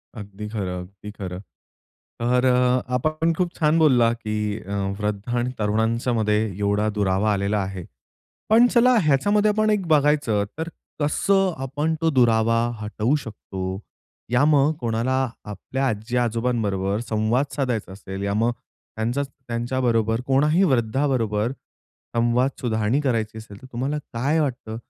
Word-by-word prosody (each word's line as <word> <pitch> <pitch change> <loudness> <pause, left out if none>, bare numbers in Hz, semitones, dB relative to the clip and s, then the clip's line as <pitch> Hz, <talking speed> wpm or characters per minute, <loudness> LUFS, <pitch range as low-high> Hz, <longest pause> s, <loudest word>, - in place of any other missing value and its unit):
अगदी 105 -1 -8
खरं, 95 -4 -3
अगदी 95 +3 -10
खरं. 90 -3 -6 0.8
तर 125 +2 +2
अ, 125 0 +3
आपा 125 +5 +1
पण 165 +1 +3
खूप 175 +1 -1
छान 155 0 +3
बोलला 125 -7 +4
की 110 -2 -5 0.3
अ, 100 - -8 0.3
वृद्धा 105 +3 -2
आणि 120 +1 -1
तरुणांच्यामध्ये 110 0 +1 0.2
एवढा 105 +1 +1
दुरावा 100 +1 +2
आलेला 100 +1 0
आहे. 95 -2 -4 0.7
पण 230 +3 +7
चला 250 +1 +4
ह्याच्यामध्ये 205 +9 +3
आपण 215 +1 +2
एक 205 -4 0
बघायचं, 145 -9 +2
तर 160 +1 -3 0.3
कसं 190 +6 +2
आपण 145 +4 -1
तो 165 0 +2
दुरावा 115 -4 +3 0.2
हटवू 105 +5 0
शकतो, 95 -7 -6 0.5
या 120 +3 +3
मग 150 0 +4
कोणाला 115 +2 0 0.3
आपल्या 130 +6 -3
आजी-आजोबांबरोबर 110 -3 -1
संवाद 110 +5 +1
साधायचा 125 -8 -2
असेल, 95 0 -7
या 100 0 -1
मग 120 - +3 0.5
त्यांचा 120 +5 -1
त्यांच्याबरोबर 120 -3 -1
कोणाही 150 +6 +3
वृद्धाबरोबर 115 -2 0 0.6
संवाद 120 +3 +2
सुधारणी 110 +2 0
करायची 115 -5 -1
असेल, 105 -2 -11
तर - - -10
तुम्हाला 135 +5 -2
काय 140 +7 +1
वाटतं? 120 -6 -3
120 Hz, 135 wpm, -23 LUFS, 105-140 Hz, 0.8 s, पण